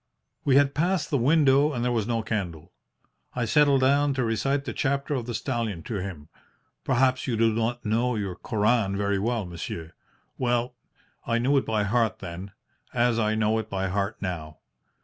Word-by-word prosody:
"We 135 - +3
had 140 0 +4
passed 175 +4 0
the 140 - +2
window 145 +2 +4
and 120 -2 -2
there 125 - +1
was 115 -3 0
no 115 -2 -1
candle. 90 -6 -4 0.6
I 125 -2 0
settled 140 +2 +4
down 140 +1 +3
to 130 - 0
recite 135 +5 0
the - - -4
Chapter 140 +1 -1
of 125 -4 -3
the 120 - -3
Stallion 115 - -3
to 110 - -4
him. 90 -6 -6 0.6
Perhaps 130 0 +2
you 120 -3 0
do 115 0 +3
not 115 +2 -2
know 115 +3 +1
your 100 -4 -3
Koran 105 -1 +1
very 100 -1 0
well, 115 0 -1
monsieur? 85 -1 -7 0.5
Well, 120 0 0 0.5
I 115 0 +2
knew 130 +5 +2
it 135 - +1
by 110 -2 +1
heart 110 +1 +1
then, 90 +4 -8 0.4
as 120 -1 +2
I 110 -1 +1
know 110 0 +1
it 110 -1 -6
by 95 -1 -2
heart 100 +3 -1
now. 80 -5 -5
115 Hz, 185 wpm, -26 LUFS, 100-130 Hz, 0.6 s, had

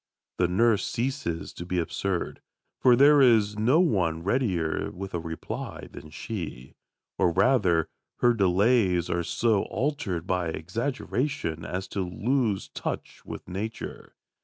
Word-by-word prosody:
The 90 - +3
nurse 105 +3 +3
ceases 120 - -3
to - - -7
be 90 +1 -3
absurd, 90 +2 -2 0.4
for 125 -1 +6
there 145 +3 +7
is 110 -5 +4
no 125 +9 +4
one 90 - +1
readier 95 -7 0
with 95 +2 -7
a 85 - -1
reply 80 0 -6
than 75 +2 -10
she. 75 - -6 0.5
Or, 85 - +4
rather, 90 -7 +3 0.3
her 120 0 +4
delays 95 -2 +3
are 85 - +1
so 110 +3 +1
altered 110 - -2
by 90 -2 0
exaggeration 115 - -2
as 95 +1 -4
to 100 - -2
lose 105 +4 0
touch - - -5
with - - -8
Nature. 105 +5 -6
95 Hz, 135 wpm, -27 LUFS, 85-120 Hz, 0.5 s, there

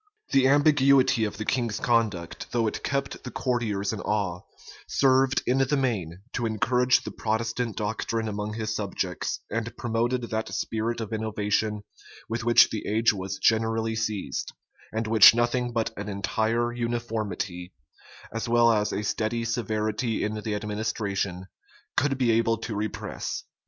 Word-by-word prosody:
The 135 -1 +5
ambiguity 140 -4 +4
of 105 - -5
the 110 - -4
king's 115 -4 0
conduct, 110 -8 0
though 120 -2 +1
it 110 - -3
kept 140 -1 -2
the 125 - -5
courtiers 115 -6 -1
in 105 - -4
awe, 95 -4 -1 0.5
served, 135 -1 +3
in 130 +2 +2
the 135 +2 +2
main, 95 -10 -2
to 120 -2 -1
encourage 125 +3 +2
the - - -6
Protestant 115 +1 -2
doctrine 110 +1 -2
among 105 0 -3
his 110 -1 -2
subjects, 95 -3 -3
and 115 +1 -3
promoted 120 +1 0
that 110 0 -2
spirit 115 +1 -2
of 110 0 -5
innovation 105 -1 -1 0.4
with 115 0 -3
which 120 +1 +6
the 110 - -4
age 110 +2 +3
was 95 -1 -4
generally 110 +1 +1
seized, 110 -3 -3 0.4
and 110 +1 -2
which 110 0 +8
nothing 120 +1 +1
but 115 -1 -1
an 100 +1 -5
entire 110 +4 0
uniformity, 110 -7 -3 0.6
as 115 +1 -3
will 120 0 +5
as 105 -2 +1
a 105 - -2
steady 110 +3 -1
severity 110 0 -1
in 105 - -1
the 105 -1 -2
administration, 105 -3 -2 0.5
could 135 -1 +2
be 125 -3 +2
able 115 0 +2
to 115 0 -5
repress. 105 0 -4
110 Hz, 150 wpm, -26 LUFS, 105-120 Hz, 0.6 s, which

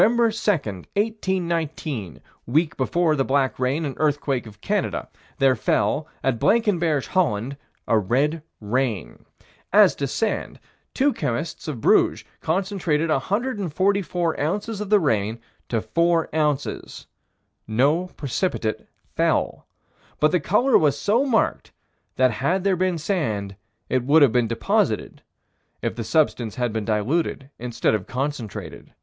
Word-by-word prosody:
2, - - +8
1819 175 - -1 0.3
week 150 +6 +1
before 160 +4 +1
the 135 - +1
black 135 -1 +1
rain 135 +5 0
and 140 - -3
earthquake 145 -5 0
of 105 -2 -13
Canada - - -1 0.3
there 135 -1 +4
fell, 125 +6 0 0.2
at 130 -4 +1
Blankenberge, 175 - +2
Holland, 140 - 0 0.3
a 115 - +4
red 140 - 0 0.2
rain. 115 -2 -2 0.5
As 205 -1 +6
to 140 - -1
sand, 215 - -2 0.4
two 275 +1 +3
chemists 155 +9 -3
of 135 -7 -4
Bruges - - +3 0.2
concentrated 165 -3 0
144 190 - 0
ounces 205 +7 -2
of 210 - -4
the 210 -1 +5
rain 110 - 0 0.3
to 115 -2 0
4 170 +8 +1
ounces 150 -3 -2 0.6
"no 140 +11 +2
precipitate 135 - -2 0.3
fell." - - 0 0.5
But 150 - +4
the 180 - +3
color 235 - +3
was 145 -3 +2
so 240 +7 +2
marked 230 -4 0 0.4
that 130 -1 +4
had 170 - 0
there 195 -1 +2
been 185 -1 0
sand, 115 - -2 0.3
it 130 -1 0
would 145 +4 +5
have 135 - +5
been 120 0 +2
deposited, 115 +1 0 0.6
if - - -1
the 115 - -4
substance 115 -2 +1
had 120 -3 -1
been 110 -2 -2
diluted 135 +6 -1
instead 120 -2 0
of 105 -4 -2
concentrated. 130 -4 -5
150 Hz, 130 wpm, -23 LUFS, 120-185 Hz, 0.6 s, 2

